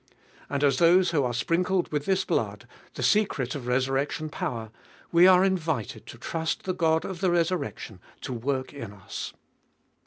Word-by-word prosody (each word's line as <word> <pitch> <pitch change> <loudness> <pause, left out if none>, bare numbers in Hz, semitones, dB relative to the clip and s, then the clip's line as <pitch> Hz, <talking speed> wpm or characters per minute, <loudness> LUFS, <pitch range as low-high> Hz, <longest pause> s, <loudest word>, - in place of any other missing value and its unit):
And 140 +1 -1
as 140 -3 +3
those 175 +1 +5
who 150 -4 +2
are 125 - 0
sprinkled 175 +8 0
with 150 -1 -1
this 190 0 +1
blood, - - -2 0.3
the - - -4
secret 170 - +2
of 130 -4 -6
resurrection 135 +5 0
power, 115 -6 -4 0.4
we 175 +2 +7
are 185 0 +7
invited 160 - -2
to - - -10
trust 160 -1 -3
the 185 - -1
God 160 -2 +1
of 190 -2 -6
the 190 - +3
resur 175 +1 +2
rection 105 - -7 0.2
to 130 - -4
work 130 +3 -2
in 115 -8 -7
us. 95 -2 -7
155 Hz, 175 wpm, -27 LUFS, 130-180 Hz, 0.4 s, we